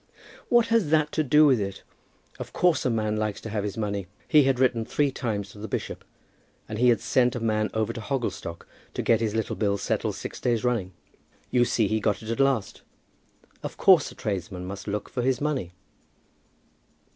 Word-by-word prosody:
"What 240 -1 +4
has 225 -9 +2
that 155 -1 +3
to 155 - +1
do 150 +2 +5
with 130 -5 +4
it? 100 -1 -5 0.6
Of - - -7
course 175 -2 +2
a - - +3
man 110 -2 0
likes 105 -1 -2
to 110 - -7
have 105 -2 -1
his 105 0 -4
money. 100 -3 -2 0.2
He 150 -4 +5
had 135 -2 +2
written 125 -3 +2
three 140 +4 0
times 105 -6 -3
to 105 - -13
the 110 - -5
bishop, - - -4 0.6
and 110 0 -5
he 125 +1 +5
had 115 -4 +4
sent 125 -1 +2
a - - -2
man 110 -1 0
over 110 -1 0
to 115 - -6
Hogglestock 115 - -4 0.3
to - - -1
get 115 -1 +3
his 110 -1 -1
little 110 -1 -1
bill 100 -2 0
settled - - -1
six - - -7
days 120 -3 0
running. 115 -7 0 0.6
You 120 -1 +4
see 110 -3 +1
he 110 +2 0
got 105 0 -1
it 110 - -4
at 115 - -3
last. 135 -7 +1 0.8
Of - - -6
course, - - +5
a - - -14
tradesman 90 -2 -4
must 100 +2 -7
look 105 0 -3
for 125 - -3
his 130 0 +1
money." 145 - -2
115 Hz, 205 wpm, -26 LUFS, 105-130 Hz, 0.8 s, do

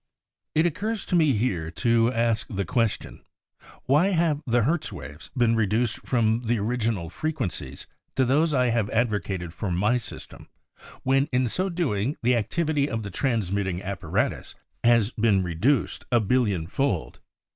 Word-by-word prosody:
It 160 +2 +4
occurs 205 +6 -2
to - - -1
me 155 -5 +4
here 100 -8 -1
to 115 +8 +2
ask 115 -2 0
the 100 -1 -2
question 115 +4 -1 0.3
— - - -22
why 150 +8 +4
have 165 -6 +1
the 120 -1 +3
Hertz 155 +3 0
waves 80 -4 -9
been 115 -2 +3
reduced 110 +1 +1
from 115 -2 +2
the 120 +1 +1
original 110 -4 -1
frequencies 115 - -4 0.3
to 130 - +3
those 150 +6 +2
I 125 -3 +2
have 115 -3 0
advocated 105 -7 -1
for 95 +4 -4
my 105 +8 +2
system, 120 - -10 0.6
when 135 +2 +2
in 125 -1 +2
so 185 +10 -1
doing 145 - -1
the 125 +1 +4
activity 145 +6 0
of 115 -1 -3
the 100 - -6
transmitting 100 -6 -1
ap 100 0 -5
paratus - - -2 0.3
has 115 -2 +4
been 105 -5 +2
reduced 90 - 0
a 120 - +5
billion 105 -6 +1
fold? 100 - -2
115 Hz, 155 wpm, -25 LUFS, 100-135 Hz, 0.6 s, a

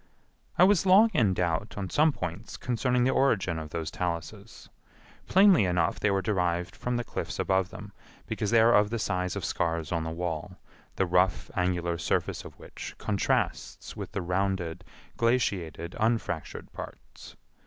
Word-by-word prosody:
I - - +7
was 195 0 +4
long 210 +5 +7
in 105 - +3
doubt 90 +3 -1
on 95 -3 -4
some 155 +1 +4
points 90 - -6
concerning 125 +1 0
the 130 - +3
origin 95 -12 +1
of 80 -1 -7
those 80 0 -4
taluses. 95 +7 -5 0.6
Plainly 190 - +6
enough 90 -2 +1
they 105 - +2
were 95 -1 +1
derived 90 -3 -1
from 125 0 -2
the 120 - -2
cliffs - - -5
above 95 -1 +1
them, 105 -1 -10 0.3
because 105 - -2
they 115 -1 +5
are 115 +1 +5
of 105 -1 +4
the 115 - -2
size 90 -4 -1
of - - -3
scars 80 -2 -1
on 85 -2 0
the 80 - -3
wall, 80 -1 -4 0.4
the 95 - +1
rough 90 -1 +1
angular 85 -2 0
surface - - -1
of - - -12
which - - -9
contrasts - - -1
with - - -7
the - - -2
rounded, 90 -2 -1 0.3
glaciated, 95 - 0
unfractured 110 -8 -2
parts. - - -10
95 Hz, 165 wpm, -28 LUFS, 85-115 Hz, 0.6 s, I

